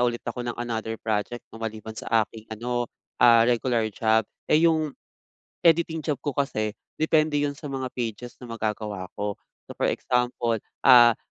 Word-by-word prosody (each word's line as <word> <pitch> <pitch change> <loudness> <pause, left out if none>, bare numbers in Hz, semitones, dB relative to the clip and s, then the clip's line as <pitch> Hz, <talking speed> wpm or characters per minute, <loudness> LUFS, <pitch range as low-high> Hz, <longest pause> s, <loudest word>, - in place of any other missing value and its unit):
ulit 120 0 -5
ako 120 +1 -4
ng 120 - -4
another 115 -2 -3
project, 110 +2 -2
'no, 115 - -10
maliban 110 0 -5
sa 110 0 +1
aking 110 +1 -14
ano, 120 +2 -2 0.3
ah, 115 -2 +7
regular 120 -1 +1
job. 110 +1 +2 0.2
Eh, 155 +2 +4
yung 155 -3 +2 0.7
editing 165 -1 +3
job - - -11
ko 145 - -2
kasi 110 -6 -1 0.2
depende 155 -1 +3
'yon 145 -1 -1
sa 150 - -10
mga 135 -2 -3
pages 120 0 -4
na 125 - -10
magagawa 105 -4 -4
ko. 105 0 -1 0.3
So, - - -9
for - - 0
example, 120 -3 0 0.2
ah, 120 -3 +8
120 Hz, 165 wpm, -25 LUFS, 110-130 Hz, 0.7 s, ah